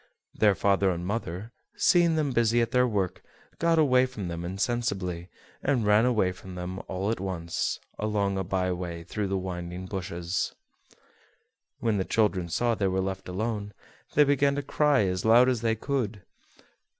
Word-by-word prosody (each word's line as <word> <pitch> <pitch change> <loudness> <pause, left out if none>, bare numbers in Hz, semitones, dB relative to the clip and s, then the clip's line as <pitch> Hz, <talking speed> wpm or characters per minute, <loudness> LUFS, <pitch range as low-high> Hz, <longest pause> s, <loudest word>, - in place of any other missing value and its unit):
Their 105 -2 +3
father 100 0 +2
and 85 -1 -2
mother, 105 0 -4 0.2
seeing 175 -2 +4
them 150 -3 0
busy 120 -1 +3
at 115 -1 +1
their 125 0 +4
work, 100 -5 -1 0.4
got 165 0 +3
away 130 -4 +4
from 105 -8 -6
them 85 0 -4
insensibly, 95 -3 -2 0.3
and 130 -5 +1
ran 105 +3 +5
away 110 -7 +2
from 95 0 -10
them 90 +1 -5
all 95 +3 -1
at 115 - -2
once, 90 -3 -2 0.2
along 105 -2 0
a 95 - -1
by 95 0 -1
way 85 -2 -4
through 105 +4 -3
the 95 0 -1
winding 90 -1 -5
bushes. 90 -2 -3 1.3
When 110 -3 +1
the - - +1
children 95 -5 +1
saw 120 +8 +1
they 100 -3 0
were 95 0 0
left 95 0 -3
alone, 105 +1 -3 0.4
they 150 - +7
began 140 0 +2
to 145 - -2
cry 145 -3 +3
as 90 -1 -1
loud 120 +3 +6
as 125 -3 +1
they 115 -1 +1
could. 115 -5 -2
100 Hz, 170 wpm, -27 LUFS, 90-120 Hz, 1.3 s, they